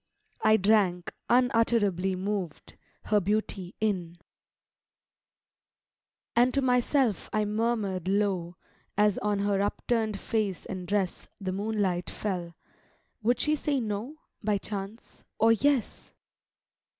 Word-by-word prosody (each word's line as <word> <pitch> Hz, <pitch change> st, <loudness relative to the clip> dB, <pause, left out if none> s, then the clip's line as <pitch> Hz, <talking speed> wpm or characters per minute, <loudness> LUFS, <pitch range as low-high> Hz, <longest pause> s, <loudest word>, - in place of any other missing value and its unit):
— -, -, -35 dB
I 220 Hz, -, +7 dB
drank, 195 Hz, -4 st, +2 dB, 0.2 s
unutterably 225 Hz, -7 st, +3 dB
moved, 190 Hz, -4 st, -4 dB, 0.3 s
Her 210 Hz, -, +3 dB
beauty 200 Hz, -1 st, -2 dB
in: 185 Hz, -6 st, -1 dB, 2.2 s
And 245 Hz, +2 st, +5 dB
to 275 Hz, -, +3 dB
myself 250 Hz, -2 st, +2 dB
I 215 Hz, 0 st, +1 dB
murmur'd 210 Hz, -4 st, -1 dB
low, 190 Hz, -3 st, 0 dB, 0.4 s
As 210 Hz, -1 st, +3 dB
on 210 Hz, 0 st, 0 dB
her 200 Hz, -1 st, +1 dB
upturn'd 215 Hz, 0 st, -1 dB
face 210 Hz, -5 st, -1 dB
and 185 Hz, -2 st, -6 dB
dress 195 Hz, -2 st, -1 dB
The 190 Hz, -2 st, -3 dB
moonlight 195 Hz, -3 st, -1 dB
fell, 175 Hz, -5 st, -4 dB, 0.7 s
"Would 240 Hz, +3 st, +2 dB
she 305 Hz, 0 st, +2 dB
say 290 Hz, -2 st, 0 dB
No, 220 Hz, +5 st, -3 dB, 0.3 s
By 210 Hz, -1 st, +2 dB
chance, 200 Hz, +2 st, -7 dB
or 225 Hz, +1 st, +5 dB
Yes?" 265 Hz, +2 st, 0 dB
210 Hz, 115 wpm, -28 LUFS, 190-225 Hz, 2.2 s, I